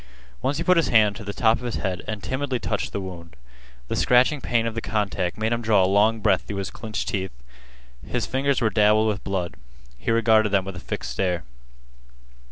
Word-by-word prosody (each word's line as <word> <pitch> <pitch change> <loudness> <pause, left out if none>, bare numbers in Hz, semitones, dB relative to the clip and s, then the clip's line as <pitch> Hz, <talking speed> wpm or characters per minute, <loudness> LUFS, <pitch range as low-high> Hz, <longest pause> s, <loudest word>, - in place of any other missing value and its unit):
Once 135 +2 0
he - - -1
put 180 -1 +4
his 165 -5 +3
hand 105 -3 +4
to 115 - -8
the 100 - -4
top 110 +2 +2
of - - -11
his 120 -2 -3
head 90 -2 -2
and 105 -2 -4
timidly 130 -1 -2
touched 110 -3 -3
the - - -3
wound. 85 -5 -8 0.5
The - - -2
scratching 130 +4 +3
pain 120 -2 +1
of 115 - -2
the 115 - -3
contact 100 -5 -2
made 110 +1 0
him 120 - -1
draw 105 -4 +3
a - - +4
long 105 +4 +3
breath - - +3
through 100 - -4
his 100 - -3
clinched 110 -3 -5
teeth. 95 -4 -2 0.7
His - - -2
fingers 135 0 0
were 110 -2 +2
dabbled 105 +1 +4
with 100 -2 -3
blood. 95 -3 -2 0.5
He - - -4
regarded 110 -2 +4
them 95 -2 +2
with 95 -1 -6
a - - -6
fixed - - -5
stare. 90 +3 -1
110 Hz, 215 wpm, -24 LUFS, 95-115 Hz, 0.7 s, put